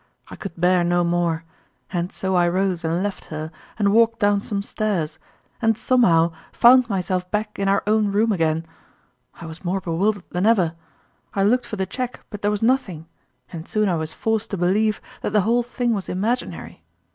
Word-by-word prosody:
I - - -8
could 180 -4 -8
bear 180 0 +3
no 175 0 +2
more; 170 -1 0 0.5
and 175 0 -1
so 190 0 -3
I 175 -1 +4
rose 185 0 0
and 165 +3 0
left 205 -1 -4
her, 155 0 -6 0.3
and 200 -2 +2
walked 230 +1 +4
down 205 -1 +2
some 200 -1 -3
stairs, 180 -9 -2 0.4
and 225 -1 +2
somehow 170 -12 +3 0.2
found 250 0 +6
myself 185 -2 -1
back 210 +1 -3
in 195 - 0
our 195 +1 +2
own 210 -1 +2
room 220 +3 +2
again! 165 -3 0 0.7
I 170 - -10
was 160 +2 -8
more 185 +2 -1
bewildered 190 +3 0
than 180 +4 +1
ever. 185 -8 +3 0.6
I 195 - +2
looked 240 +4 +2
for - - -4
the 190 -2 -1
cheque, 250 +5 -5
but 205 -1 -7
there 205 - +1
was 210 +1 -1
nothing, 215 - 0 0.5
and 165 -1 -7
soon 215 -1 +1
I 180 - +1
was 160 -1 -3
forced 220 -1 -1
to 200 - -3
believe 210 +5 +1 0.2
that - - -3
the 210 - +4
whole 235 +5 +2
thing 240 0 -1
was 200 -3 -4
imaginary. 220 +7 -3
195 Hz, 190 wpm, -22 LUFS, 175-215 Hz, 0.7 s, found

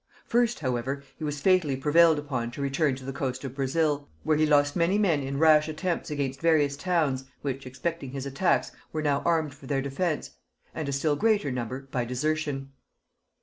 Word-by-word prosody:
First, 240 -3 +1
however, 130 +1 -2 0.2
he - - -6
was 145 -1 -3
fatally 180 -5 +3
prevailed 160 +3 +5
upon 130 -5 -3
to 140 - -6
return 140 0 +1
to 130 0 -10
the 135 - -4
coast 130 -1 -3
of 135 -2 -5
Brazil, 145 +2 0
where 155 - +2
he 155 +1 +3
lost 145 -1 +3
many 175 +3 +2
men 175 -9 +2
in 135 +1 -3
rash 155 0 +5
attempts 165 +3 -2
against 135 -2 -3
various 155 -4 +3
towns, 145 -5 0 0.2
which 135 -2 -3
expecting 135 +3 -4
his 135 +1 -5
attacks 140 +7 +1 0.2
were 155 -1 -3
now 145 -2 +1
armed 160 -4 +1
for 135 -1 -14
their 140 -1 0
defence, 150 +4 -2 0.4
and 155 -3 -3
a - - -1
still 145 +2 +1
greater 205 -7 +2
number 125 +1 -4
by 125 - 0
desertion. 135 +2 -2
145 Hz, 190 wpm, -27 LUFS, 135-160 Hz, 0.4 s, prevailed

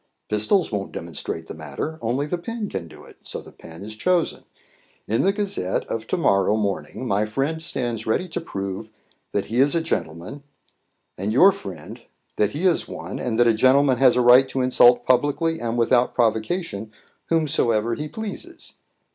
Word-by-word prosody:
Pistols 110 - +2
won't 100 -2 -4
demonstrate 80 0 -5
the - - -8
matter; 80 - -6
only 125 +5 -1
the 175 +4 -3
pen 225 +3 -4
can 85 - -5
do - - -14
it, - - -16
so - - -6
the - - -13
pen 80 +4 -11
is 110 - -7
chosen. 175 +8 0 0.6
In 110 - +1
the 195 - +3
Gazette 200 - -2
of 115 0 -5
to - - -1
morrow 100 - +2
morning 100 +1 -3
my 105 0 +1
friend 140 +8 -2
stands 120 -8 -1
ready 180 +11 0
to 175 - -4
prove 100 - -5 0.4
that 100 - -1
he 115 +3 -2
is 140 +3 +4
a - - +3
gentleman; 95 - -4 0.8
and 100 +3 -1
your 180 - +7
friend 95 - -9 0.4
that 105 - +3
he 160 +6 -2
is 180 -3 +2
one, - - -7
and 120 -2 -2
that 120 - +6
a 115 - +5
gentleman 130 +3 +4
has 130 -3 +5
a 125 - +3
right 125 +2 +6
to 130 - -1
insult 125 -1 +5
publicly 145 +5 +1
and 120 0 -2
without 120 +1 +2
provocation 110 - -1 0.4
whomsoever 120 -9 +1
he 150 +5 -4
pleases. 220 - -7
120 Hz, 180 wpm, -23 LUFS, 105-160 Hz, 0.8 s, your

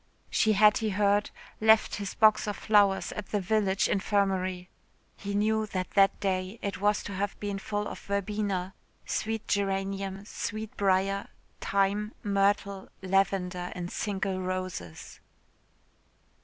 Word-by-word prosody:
She 220 - +3
had, 210 +1 +5
he 220 - -1
heard, 205 +1 +2 0.3
left 220 0 +4
his 200 -2 -5
box 215 -1 +4
of 205 - -2
flowers 205 -3 +3
at 210 - -6
the 210 - -1
village 195 0 +1
infirmary. 190 -3 0 0.5
He 200 0 -5
knew 215 +1 +1
that 185 -2 -3
that 195 -1 +4
day 190 +1 -1
it 200 -1 -3
was 205 0 +2
to 200 - -6
have 200 +1 -3
been 200 -1 -3
full 205 +1 -3
of - - -7
verbena, 200 -2 -2 0.3
sweet 220 0 -2
geranium, 195 0 -1
sweet 215 +1 -5
briar, 195 0 +1 0.3
thyme, 200 +2 0
myrtle, 200 -1 0
lavender 185 -2 0
and 175 0 -5
single 195 -2 -2
roses.... 185 - -5
200 Hz, 130 wpm, -28 LUFS, 190-210 Hz, 0.5 s, had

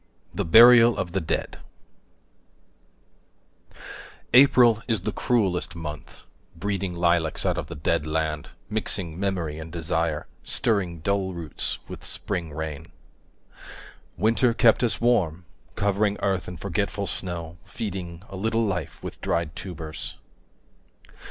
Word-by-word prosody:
THE - - -1
BURIAL 115 +5 +8
OF 90 -3 -2
THE 95 +1 -1
DEAD 80 - -3 2.7
APRIL 125 -4 +6
is 110 -6 0
the - - -2
cruellest 95 -8 0
month, 80 -2 -8 0.3
breeding 95 0 -2
Lilacs 85 -2 +1
out - - +2
of - - -5
the 85 - -7
dead 80 +1 0
land, 75 -1 -2 0.2
mixing 95 -5 -3
Memory 90 -6 -2
and 80 +1 -8
desire, 80 -2 -1 0.2
stirring 90 -7 0
Dull 95 0 -1
roots 80 -4 -2
with - - -9
spring 85 -3 -2
rain. 75 -1 -5 1.3
Winter 115 +4 +3
kept 120 0 +4
us 120 - +1
warm, 90 -9 +1 0.3
covering 100 0 +1
5 - - -11
Earth 95 -2 0
in 90 - -7
forgetful 100 +2 -2
snow, 85 -3 -4
feeding 95 -3 -6
A 95 - -8
little 110 +4 0
life 95 -4 -4
with - - -7
dried 85 -2 -1
tubers. 80 -4 -6
90 Hz, 125 wpm, -25 LUFS, 80-105 Hz, 2.7 s, BURIAL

